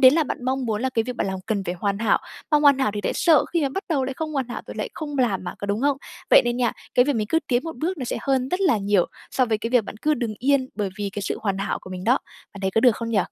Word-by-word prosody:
đến 260 +1 +8
là 320 -1 +3
bạn 250 - -5
mong 260 0 -1
muốn 220 +1 -1
là 260 - 0
cái 230 -3 +1
việc 250 +1 -5
bạn - - 0
làm 190 -1 -3
cần 210 -3 0
phải 175 -1 -2
hoàn 200 +2 -1
hảo, 225 - +3 0.3
mà 300 - +5
hoàn 285 -2 +5
hảo 265 -6 +2
thì 205 - -2
lại - - +1
sợ 325 -4 +4
khi 335 -3 +2
mà 275 - +2
bắt 340 +9 -4
đầu 285 -6 +1
lại 265 0 -3
không 315 -1 -3
hoàn 265 -4 -1
hảo 240 - -5
rồi - - -8
lại - - -3
không 295 -3 -5
làm 205 -8 +1
mà, - - -5
có 200 - -5
đúng 200 +2 -1
hông? 280 0 +2 0.3
Vậy - - +8
nên 240 0 0
nha, 245 -2 +1 0.2
cái 245 - +6
việc 285 -2 0
mình 215 -1 0
cứ 325 - +2
tiến 245 0 +1
một 325 -4 -6
bước 330 +6 -2
nó 255 - -3
sẽ - - -2
hơn 265 -2 +1
rất 365 +5 -1
là 350 - +3
nhiều 200 -2 +2 0.2
so 255 - +2
với 220 -3 0
cái 230 +2 -4
việc 245 -4 +4
bạn - - -8
cứ 305 0 +3
đừng 235 -6 -3
yên 270 0 +2
bởi 205 -2 -1
vì 200 -1 -2
cái 205 - -4
sự - - -2
hoàn 195 -2 0
hảo 195 - -2
của 185 - -11
mình 185 0 -6
đó. 250 +4 +4 0.4
Bạn 200 - -8
thấy 190 0 0
có 225 - +2
được 245 -3 +5
không 230 -1 -4
nhỉ? 215 - +2
245 Hz, 340 wpm, -24 LUFS, 210-280 Hz, 0.4 s, đến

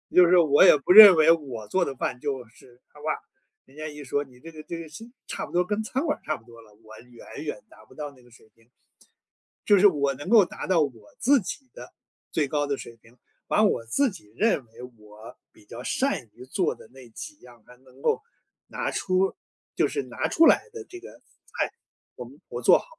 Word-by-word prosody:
就 180 - +8
是 180 +1 +4
我 155 -4 +5
也 - - +7
不 145 +5 +2
认 205 -4 +11
为 155 0 +5
我 135 -10 0
做 185 - +1
的 140 - -4
饭 125 - -3
就 135 -1 -4
是 125 +1 -21
他 150 - -18
吧 150 - -8 0.6
人 135 +2 -21
家 155 - -6
一 150 0 -10
说： 145 +3 -1
“你 125 -3 -20
这 165 - -12
个 155 -1 -11
这 170 - -7
个 165 - -8 0.4
差 - - -5
不 - - -15
多 180 +1 +1
跟 210 +3 -2
餐 260 +7 -3
馆 - - -1
儿 - - -32
差 155 -1 -2
不 115 - -23
多 115 -1 -15
了。” 110 -2 -20
我 110 0 -14
远 125 +4 -12
远 150 -4 -6
达 110 - -18
不 110 - -20
到 150 -1 -7
那 130 -3 -21
个 120 - -22
水 110 -1 -21
平。 115 +1 -29 0.9
就 205 - +5
是 195 - +4
我 140 -7 +3
能 145 +5 -10
够 225 -2 +7
达 - - -8
到 180 -4 +2
我 115 -8 -5
自 280 +3 +4
己 260 +7 -8
的 - - -12 0.4
最 150 -3 0
高 145 +1 -1
的 145 -1 -2
水 120 -3 -11
平， 115 +1 -23 0.3
把 - - +2
我 115 - +1
自 275 - +1
己 135 - -14
认 210 - +1
为 115 +1 -16 0.2
我 105 +1 -14
比 - - -22
较 115 +4 -10
善 260 - -1
于 120 +3 -13
做 180 +7 -1
的 - - -16
那 130 -1 -14
几 300 - -9
样， 120 -3 -17
还 125 - -17
能 130 +1 -20
够 - - +1 0.5
拿 - - -4
出 185 +1 0 0.4
就 - - +2
是 420 - -3
拿 - - -4
出 325 0 +4
来 - - +6
的 450 -1 -8
这 365 - -10
个 430 - -14
菜， - - -6 0.4
我 - - -8
们 - - -16
我 - - -6
做 - - +6
好。 - - -14
145 Hz, 250 characters per minute, -25 LUFS, 120-180 Hz, 0.9 s, 认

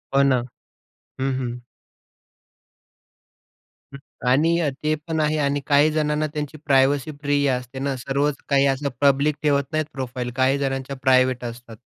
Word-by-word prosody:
हो 140 - +6
ना. 130 -2 +3 0.8
हं, 135 0 0
हं. 125 -1 -4 2.3
हं. - - -7 0.3
आणि 165 +6 +3
अ, 150 - +1
ते 155 0 +2
पण 160 -1 -1
आहे. 155 +1 +1
आणि 145 -1 0
काही 145 +1 +4
जणांना 155 0 0
त्यांची 150 0 -4
प्रायव्हसी 140 +1 +3
प्रिय 145 -1 +1
असते 125 +1 -4
ना, 135 0 -1
सर्वच 140 +3 -1
काही 140 0 +4
असं 140 +1 0
पब्लिक 140 +1 +3
ठेवत 140 -1 +3
नाहीत 155 0 0
प्रोफाइल. 125 -2 -4
काही 130 +1 +2
जणांच्या 135 0 -3
प्रायव्हेट 130 -1 +3
असतात. 120 -1 -8
140 Hz, 145 wpm, -23 LUFS, 130-150 Hz, 2.3 s, हो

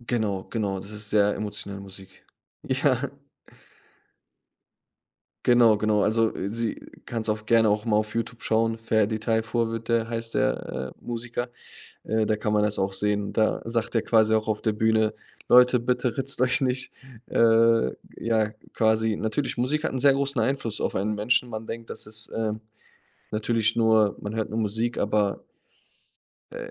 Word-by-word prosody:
Genau, 110 -5 -2
genau, 100 -4 -2
das 100 - -9
ist 105 0 -3
sehr 105 -1 +3
emotionale 100 -1 -5
Musik. 95 -1 -10 0.4
Ja. - - 0 2.4
Genau, 120 -3 +6
genau. 105 -1 +1
Also, 110 +1 +2 0.2
sie 115 +1 -2 0.3
kannst 115 -1 -3
auf 110 0 -1
gerne 115 -1 +4
auch 105 +2 +1
mal 110 -2 +2
auf 110 0 -1
Youtube 115 +1 -4
schauen, 115 0 +1
Ferdi 110 -1 +1
Tayfur 115 +1 0
wird 115 +1 -5
der 115 -1 +1
heißt 115 0 -4
der, 65 0 -1
äh, - - -26
Musiker, 120 +1 -4 0.5
äh, 110 0 +1
da 110 - +1
kann 105 0 -1
man 105 - +3
das 105 0 +1
auch 95 0 0
sehen. 105 0 -1
Da 110 -1 +1
sagt 115 0 -2
er 115 - +3
quasi 110 -1 +3
auch 110 0 0
auf 105 -1 -1
der 110 - +1
Bühne: 110 0 +2 0.4
„Leute, 125 0 +6
bitte 125 -1 0
ritzt 135 -1 +1
euch 130 +2 +3
nicht." 130 0 -1 0.4
Äh, 115 - +4 0.3
ja, 110 -2 +1 0.2
quasi 110 -1 +2
natürlich, 115 +4 -2
Musik 150 +5 0
hat - - -1
'n 130 - -2
sehr 140 +1 +5
großen 140 -2 0
Einfluss 115 -3 -1
auf - - -1
einen 105 +2 -1
Menschen. 120 +4 +1
Man 110 0 -6
denkt, 115 0 -7
das - - -3
ist, 110 +1 +2
äh, 110 -1 -2 0.8
natürlich 110 +1 0
nur 110 -3 +3
man 105 +2 -5
hört 110 - -2
nur 110 +2 -2
Musik, 110 +3 -1
aber 105 -1 0 1.1
äh, - - -7
110 Hz, 165 wpm, -25 LUFS, 105-115 Hz, 2.4 s, Genau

